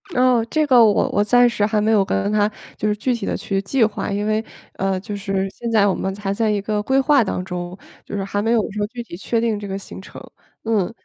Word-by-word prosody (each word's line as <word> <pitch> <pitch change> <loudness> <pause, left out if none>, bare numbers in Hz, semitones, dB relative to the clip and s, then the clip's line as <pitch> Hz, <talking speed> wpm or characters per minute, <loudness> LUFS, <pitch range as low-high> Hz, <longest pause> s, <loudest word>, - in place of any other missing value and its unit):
哦， 250 -2 +4
这 310 -1 +1
个 250 -4 +6
我 210 -2 +3
我 205 - +2
暂 245 +3 +5
时 215 -3 -1
还 215 0 +1
没 215 +2 +2
有 205 -3 +4
跟 95 - -1
她， 210 0 +2 0.3
就 215 - -1
是 210 - +1
具 250 +4 -1
体 235 - -4
地 - - -2
去 195 -1 -2
计 235 +4 +1
划。 215 - -1
因 205 +1 -1
为， 215 +1 0 0.3
呃， 195 -1 -1
就 205 +2 -6
是 195 -1 -2
现 235 -1 -5
在 210 -2 +4
我 195 - +2
们 190 0 -3
还 200 -1 -3
在 220 +1 0
一 205 -1 +1
个 210 0 -1
规 265 +5 +2
划 275 -2 +4
当 185 -2 -3
中， 180 0 -5 0.3
就 - - -6
是 195 - -2
还 205 +1 -2
没 225 +2 0
有 235 - +4
说 205 0 -2
具 240 +1 -7
体 170 - -10
确 225 +5 -1
定 225 -3 0
这 205 - -7
个 195 0 -4
行 190 - -10
程， - - -11 0.4
嗯， 220 -3 0
210 Hz, 285 characters per minute, -21 LUFS, 195-230 Hz, 0.4 s, 个